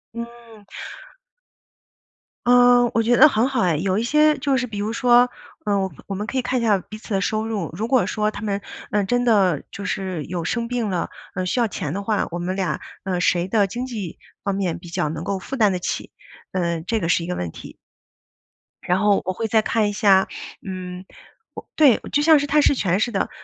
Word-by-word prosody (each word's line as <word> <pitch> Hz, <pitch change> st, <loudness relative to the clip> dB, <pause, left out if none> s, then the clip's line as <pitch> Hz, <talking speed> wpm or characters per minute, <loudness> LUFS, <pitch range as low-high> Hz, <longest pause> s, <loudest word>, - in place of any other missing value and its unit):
嗯。 235 Hz, -2 st, -9 dB, 1.8 s
嗯， 245 Hz, -1 st, +6 dB
我 230 Hz, -, +3 dB
觉 240 Hz, +2 st, +3 dB
得 305 Hz, -, +9 dB
很 245 Hz, -3 st, +2 dB
好 255 Hz, -4 st, 0 dB
哎。 175 Hz, -3 st, +2 dB
有 185 Hz, +4 st, 0 dB
一 225 Hz, -, 0 dB
些 300 Hz, +4 st, +4 dB
就 275 Hz, 0 st, 0 dB
是 255 Hz, -1 st, 0 dB
比 215 Hz, -3 st, -7 dB
如 210 Hz, +2 st, -2 dB
说， 245 Hz, +1 st, +5 dB, 0.4 s
呃， 205 Hz, -1 st, +1 dB
我 190 Hz, -1 st, -2 dB
我 200 Hz, -, -5 dB
们 205 Hz, +2 st, -4 dB
可 265 Hz, -, -3 dB
以 255 Hz, -, +1 dB
看 250 Hz, 0 st, 0 dB
一 -, -, -3 dB
下 210 Hz, -3 st, +4 dB
彼 205 Hz, +3 st, -10 dB
此 215 Hz, -, -12 dB
的 -, -, +2 dB
收 215 Hz, +3 st, -1 dB
入， 210 Hz, -8 st, -3 dB
如 220 Hz, +5 st, -2 dB
果 255 Hz, -1 st, +3 dB
说 210 Hz, -1 st, 0 dB
它 215 Hz, -, -7 dB
们， 200 Hz, -1 st, -2 dB, 0.3 s
呃， 210 Hz, 0 st, +2 dB
真 245 Hz, +5 st, 0 dB
的 195 Hz, -, +3 dB
就 200 Hz, -, -7 dB
是 185 Hz, -5 st, -3 dB
有 175 Hz, -1 st, -4 dB
生 235 Hz, +7 st, -2 dB
病 240 Hz, -2 st, -1 dB
了， 175 Hz, -2 st, -2 dB, 0.2 s
呃， 185 Hz, -, -2 dB
需 245 Hz, -, 0 dB
要 235 Hz, -, +3 dB
钱 200 Hz, -, -4 dB
的 200 Hz, +2 st, -3 dB
话， 210 Hz, 0 st, 0 dB
我 175 Hz, -, -5 dB
们 180 Hz, +2 st, -3 dB
俩， 190 Hz, -2 st, -1 dB, 0.2 s
呃， 185 Hz, -2 st, -1 dB
谁 175 Hz, +1 st, +1 dB
的 205 Hz, 0 st, +3 dB
经 240 Hz, +6 st, -4 dB
济 210 Hz, -9 st, -6 dB, 0.2 s
方 200 Hz, -, -1 dB
面 190 Hz, -4 st, -1 dB
比 175 Hz, 0 st, -12 dB
较 155 Hz, -3 st, -1 dB
能 160 Hz, +1 st, -5 dB
够 195 Hz, +1 st, -2 dB
负 265 Hz, -, -6 dB
担 215 Hz, -6 st, +3 dB
得 180 Hz, -, -2 dB
起， 180 Hz, -, -4 dB, 0.4 s
呃， 170 Hz, -3 st, -1 dB
这 220 Hz, +7 st, -1 dB
个 165 Hz, -, -2 dB
是 170 Hz, -, +2 dB
一 -, -, -6 dB
个 180 Hz, -, -2 dB
问 -, -, -3 dB
题。 -, -, -11 dB, 1.1 s
然 180 Hz, +1 st, +1 dB
后 205 Hz, -1 st, +3 dB
我 185 Hz, -, -1 dB
会 225 Hz, +3 st, -3 dB
再 220 Hz, -1 st, +3 dB
看 215 Hz, -1 st, +1 dB
一 -, -, -4 dB
下 195 Hz, -3 st, +4 dB, 0.4 s
嗯， 185 Hz, -1 st, -6 dB, 0.7 s
对， 285 Hz, -7 st, +6 dB
就 290 Hz, -, +2 dB
像 315 Hz, 0 st, +6 dB
是 285 Hz, -, -1 dB
探 300 Hz, +1 st, +4 dB
视 285 Hz, -, +4 dB
权 195 Hz, -5 st, +1 dB
似 240 Hz, +2 st, 0 dB
的。 195 Hz, -, -1 dB
210 Hz, 240 characters per minute, -22 LUFS, 185-240 Hz, 1.8 s, 得